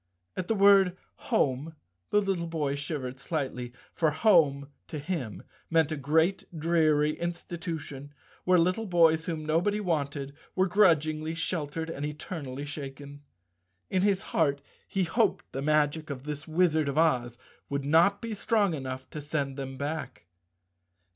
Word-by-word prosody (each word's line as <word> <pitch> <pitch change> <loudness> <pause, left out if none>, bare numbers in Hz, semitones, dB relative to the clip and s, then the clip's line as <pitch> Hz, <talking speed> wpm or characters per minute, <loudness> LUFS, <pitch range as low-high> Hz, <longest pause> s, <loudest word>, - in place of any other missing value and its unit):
At 185 - -3
the 225 - +1
word 195 -2 +5 0.3
"home" 140 +4 +1 0.3
the 210 - +3
little 190 -4 -1
boy 155 -4 -1
shivered 140 -3 -4
slightly, 135 -5 -3 0.2
for 160 - +2
home 150 -5 +3 0.2
to 155 - -5
him 145 - -4 0.3
meant 160 -2 +3
a - - 0
great, 160 +6 +2 0.2
dreary 155 -2 +2
institution 165 -5 -5 0.3
where 185 0 +4
little 185 +6 +1
boys 165 -3 +4
whom 160 -3 -3
nobody 175 +7 +1
wanted 140 -7 -2 0.2
were 190 - +3
grudgingly 160 -5 +2
sheltered 160 -1 -3
and 145 - -5
eternally 145 -2 -5
shaken. 145 0 -8 0.7
In 185 - +2
his 195 -1 +2
heart 140 -3 +2 0.2
he 195 - 0
hoped 210 +3 0
the 135 - -4
magic 150 +1 +1
of 135 -2 -5
this 150 +1 -5
Wizard 160 -3 +2
of 140 - -3
Oz 125 -7 +2 0.3
would 140 0 -2
not 170 +8 +4
be 230 -1 -3
strong 205 -2 +1
enough 130 -3 -5
to 150 - -6
send 145 -2 -2
them 135 -1 -6
back. 140 - -4
155 Hz, 145 wpm, -28 LUFS, 140-175 Hz, 0.7 s, word